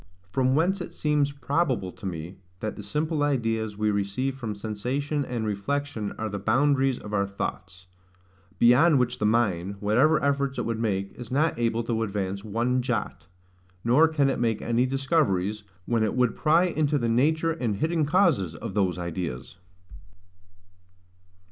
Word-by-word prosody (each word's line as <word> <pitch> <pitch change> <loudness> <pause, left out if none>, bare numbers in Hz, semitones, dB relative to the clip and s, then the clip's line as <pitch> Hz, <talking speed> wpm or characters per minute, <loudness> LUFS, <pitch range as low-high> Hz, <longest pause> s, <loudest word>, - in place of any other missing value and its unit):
From 130 +4 +2
whence 180 +5 +1
it - - -7
seems 150 -2 +1
probable 140 - -1
to 95 - -8
me, 85 +1 -6 0.2
that 110 +1 -4
the - - -7
simple 155 0 -2
ideas 115 -7 0
we 105 0 +1
receive 100 +7 -1
from 115 -5 -5
sensation 125 +8 -2
and 120 -4 -3
reflection 110 +2 -2
are 110 - -2
the 100 -1 -4
boundaries 135 +4 +2
of 105 - -9
our 100 -1 +1
thoughts; 95 -2 -6 0.7
beyond 135 +7 +5
which 125 0 0
the 105 - +2
mind, 100 -4 +1
whatever 125 +10 +3
efforts 140 -1 0
it - - -2
would 115 -1 -2
make, 100 -3 -1
is 120 -3 -9
not 145 0 +1
able 115 0 0
to 115 -1 -1
advance 100 -2 -3
one 120 +4 0
jot; 105 -8 -3 0.6
nor 130 +8 +5
can 155 -3 +1
it 135 - 0
make 115 -2 +1
any 120 +2 +1
discoveries, 130 - 0 0.2
when 115 -2 +1
it 110 - 0
would 125 -2 +2
pry 160 +3 +3
into 155 -4 +1
the 120 -4 -1
nature 155 +8 +2
and 120 -10 -2
hidden 160 - 0
causes 150 - +2
of - - -6
those 95 -4 +1
ideas. 85 -5 -5
120 Hz, 160 wpm, -26 LUFS, 105-140 Hz, 0.7 s, beyond